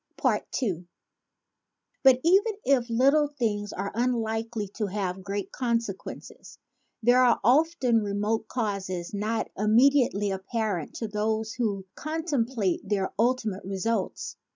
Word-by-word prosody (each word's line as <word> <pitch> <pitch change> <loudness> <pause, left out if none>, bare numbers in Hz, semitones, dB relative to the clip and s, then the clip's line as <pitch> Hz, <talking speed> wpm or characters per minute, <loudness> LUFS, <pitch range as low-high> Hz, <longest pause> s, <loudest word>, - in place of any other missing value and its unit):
II 180 -9 -2 1.1
BUT 265 -2 +6
even 390 +6 +4
if 250 -3 +2
little 275 +6 +4
things 220 -8 -2
are 200 +1 -4
unlikely 225 -2 -1
to 210 +1 -3
have 190 -1 -3
great 200 0 -4
consequences, 230 -6 -4 0.5
there 245 +2 +5
are 245 - +4
often 260 -2 +3
remote 210 +2 -1
causes 195 -7 -3
not 215 +2 -2
immediately 220 -1 +3
apparent 190 -3 -3
to 225 - -3
those 220 +1 -1
who 205 -6 -2
contemplate 265 - -1
their 195 -1 -1
ultimate 230 -4 0
results. 195 +2 -2
220 Hz, 110 wpm, -27 LUFS, 200-250 Hz, 1.1 s, BUT